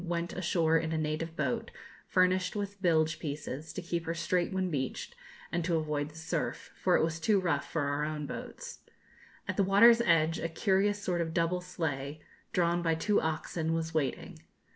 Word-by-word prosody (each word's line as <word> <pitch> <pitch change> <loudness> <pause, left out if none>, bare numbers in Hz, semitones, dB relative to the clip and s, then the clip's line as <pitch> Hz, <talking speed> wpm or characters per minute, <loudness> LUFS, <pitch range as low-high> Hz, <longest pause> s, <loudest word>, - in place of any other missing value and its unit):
went 170 -1 -2
ashore 165 -2 +2
in 160 0 -3
a 160 - 0
native 155 +1 -2
boat, 140 -6 -1 0.4
furnished 185 +1 +2
with 200 -1 -4
bilge 160 -3 +2
pieces, 150 0 -5
to 185 - -6
keep 170 -1 -3
her 165 - -1
straight 170 +1 0
when 190 -1 -1
beached, 130 -4 -3 0.4
and 175 -1 0
to 170 0 +1
avoid 150 -2 -1
the 155 - -17
surf, 160 0 -3
for - - +2
it - - +2
was 165 0 -1
too 200 +4 +3
rough 165 -6 -1
for 160 - 0
our 145 +1 0
own 150 -1 -3
boats. 485 - -7 0.7
At - - -3
the 200 - +4
water's 230 +5 +7
edge 165 -5 +3
a 165 - -2
curious 195 +4 +2
sort 175 -2 0
of 165 -1 -3
double 170 +1 +1
sleigh, 155 -5 -3 0.3
drawn 175 -1 +2
by 165 -1 +2
two 205 +6 +2
oxen, 160 +1 -1
was 165 0 -2
waiting. 155 -4 -2
165 Hz, 185 wpm, -31 LUFS, 155-180 Hz, 0.7 s, water's